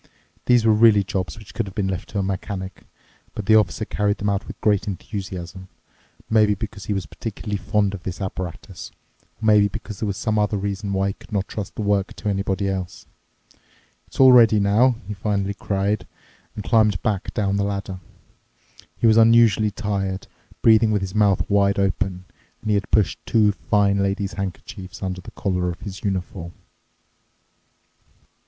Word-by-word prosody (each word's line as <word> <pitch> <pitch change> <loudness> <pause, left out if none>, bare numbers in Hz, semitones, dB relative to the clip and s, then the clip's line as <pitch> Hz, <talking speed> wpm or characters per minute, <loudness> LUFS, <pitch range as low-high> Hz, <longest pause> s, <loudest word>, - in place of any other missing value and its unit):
These 120 -2 +4
were 110 - +5
really 105 -2 +5
jobs 95 -1 -3
which 105 -2 -13
could 115 - -2
have 95 - -10
been 100 -2 0
left 95 -2 -4
to 105 - -5
a 100 - +1
mechanic, 95 0 -5 0.5
but 105 - -5
the 110 - +4
Officer 110 -1 +3
carried 105 0 0
them 105 - -1
out 100 0 -2
with - - -9
great 105 -1 +1
enthusiasm, 95 -2 -6 0.6
maybe 110 -2 +3
because 105 -1 -7
he 105 - -1
was 95 -3 -2
particularly 105 +4 -5
fond 100 +1 0
of 100 - -6
this 90 +1 -6
apparatus 95 -3 -6 0.5
or 110 - -5
maybe 105 -1 +5
because 105 -1 -8
there 110 - -2
was 100 -1 -3
some 110 -1 0
other 105 0 +1
reason 100 0 -3
why 95 0 +1
one - - -3
could - - -17
not 100 -2 -1
trust 105 -3 -6
the 110 - -3
work 100 -1 0
to 105 - -3
anyone 100 -1 -1
else. 95 -2 -3 1.0
"It's - - -14
all 130 -1 +8
ready 115 -3 +6
now!" 110 +6 +3
he 105 - -4
finally 100 0 -1
cried 100 -1 -2 0.5
and 105 - -5
climbed 105 -4 +3
back 100 -3 -1
down 100 -2 0
the 100 - +1
ladder. 100 -2 -4 1.0
He - - -1
was 110 -1 +6
unusually 115 -2 +5
tired, 100 -2 -3 0.4
breathing 110 0 +6
with 105 -2 +1
his 95 -1 -5
mouth 105 -3 +2
wide 100 0 +2
open, 95 -1 -1 0.4
and 110 - -1
he - - +3
had 100 -1 -1
pushed 105 -4 +1
two 110 -3 +4
fine 100 -1 +1
lady's 100 +1 -1
handkerchiefs 95 0 -7
under 95 -1 -3
the - - -10
collar 90 -2 -2
of 85 - -7
his 100 -2 -8
uniform. 90 -3 -3
100 Hz, 180 wpm, -22 LUFS, 95-105 Hz, 1.0 s, all